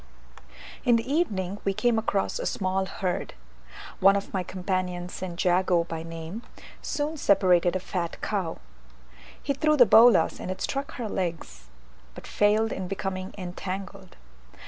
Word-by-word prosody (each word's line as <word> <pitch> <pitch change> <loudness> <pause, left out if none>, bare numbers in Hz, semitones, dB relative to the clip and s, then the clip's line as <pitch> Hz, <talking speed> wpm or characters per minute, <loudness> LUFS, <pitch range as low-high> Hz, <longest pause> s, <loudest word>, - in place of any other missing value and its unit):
In 240 - +4
the 230 +1 -1
evening 205 - -1
we 195 -1 0
came 240 0 +2
across 200 -3 -1
a - - -2
small 190 0 -1
herd. 185 - -3 0.6
One 195 +1 +6
of 200 - -3
my 190 - 0
companions, 180 -1 -3
St. 180 -2 -6
Jago 180 -1 +3
by 165 -1 -5
name, 165 +5 -7 0.4
soon 300 +2 -2
separated 180 - +3
a - - +1
fat 175 -2 -4
cow: 190 -6 -2 0.9
he 280 - 0
threw 305 +2 +2
the 245 - +8
bolas, 225 -5 +6
and - - -6
it 185 0 -4
struck 275 +7 -3
her 240 -3 -4
legs, 165 - -4 0.5
but - - -10
failed 215 +2 +2
in 190 -1 -4
becoming 190 0 -4
entangled. 190 +1 -6
190 Hz, 145 wpm, -26 LUFS, 180-215 Hz, 0.9 s, the